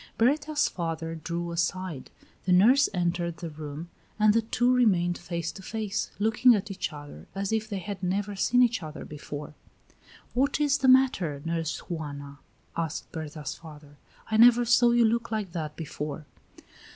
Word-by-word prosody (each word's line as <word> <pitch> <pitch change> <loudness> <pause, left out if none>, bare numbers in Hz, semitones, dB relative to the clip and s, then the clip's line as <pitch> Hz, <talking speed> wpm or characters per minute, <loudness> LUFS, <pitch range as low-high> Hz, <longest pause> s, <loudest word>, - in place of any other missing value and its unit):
Berta's 290 +5 +2
father 165 -2 -4
drew 170 +2 -4
aside; 170 -3 -2 0.4
the 185 - +1
nurse 240 +10 +6
entered 175 -2 -1
the 170 -1 -6
room, 150 +2 -8 0.3
and 210 -1 +5
the 230 - +3
two 240 +3 +1
remained 185 -8 +3
face 170 -1 -4
to - - -11
face, 215 0 -3
looking 225 +3 +5
at 205 0 -3
each 185 -2 -3
other 145 - -11
as 195 +1 -2
if 220 -1 -1
they 200 - -3
had 195 0 -6
never 200 +2 -1
seen 245 +6 +4
each 240 -4 +1
other 155 -1 -7
before." 150 0 -8 0.8
"What 275 +4 +1
is 290 -1 +2
the 265 - +2
matter, 255 - +4
Nurse 165 -1 -3
Juana?" 145 -4 -6 0.4
asked 165 -2 -4
Berta's 155 -3 -5
father. 150 -3 -13 0.3
"I 220 - 0
never 240 +1 +7
saw 240 +1 +5
you 235 0 +4
look 230 +1 +1
like 215 -5 -3
that 155 -3 -4
before." 150 -1 -5
180 Hz, 165 wpm, -27 LUFS, 160-225 Hz, 0.8 s, never